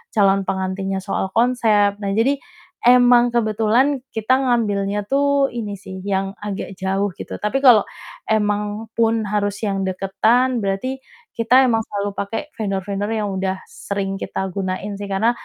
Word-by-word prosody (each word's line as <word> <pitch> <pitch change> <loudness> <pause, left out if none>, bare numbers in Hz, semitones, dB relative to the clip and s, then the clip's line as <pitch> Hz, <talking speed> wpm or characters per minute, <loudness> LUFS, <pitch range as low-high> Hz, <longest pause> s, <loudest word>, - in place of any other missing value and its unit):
calon 195 -1 +4
pengantinnya 190 0 -2
soal 195 -1 -2
konsep. 220 -4 +3
Nah 200 -1 -2
jadi 270 +6 +2 0.4
emang 245 0 +6
kebetulan 235 +4 +1
kita 220 +3 0
ngambilnya 205 -5 0
tuh 280 +2 +2
ini 210 -4 -4
sih 190 -1 -9
yang 195 0 -2
agak 200 -1 -5
jauh 195 0 0
gitu. - - -7
Tapi 235 +6 -1
kalau 245 -6 +7 0.4
emang 210 0 -1
pun 225 -1 +2
harus 205 -1 -1
yang 195 -3 -1
deketan 220 +7 +1
berarti 195 +8 -2 0.4
kita 240 +3 +5
emang 225 -2 +2
selalu 205 0 -2
pakai 200 +6 -2 0.2
vendor-vendor 200 -1 -2
yang 210 -2 -1
udah 190 0 -2
sering 195 -1 -4
kita 190 0 -3
gunain 195 +2 -3
sih, 205 - -5
karena 200 +4 +2
205 Hz, 145 wpm, -20 LUFS, 195-230 Hz, 0.4 s, kalau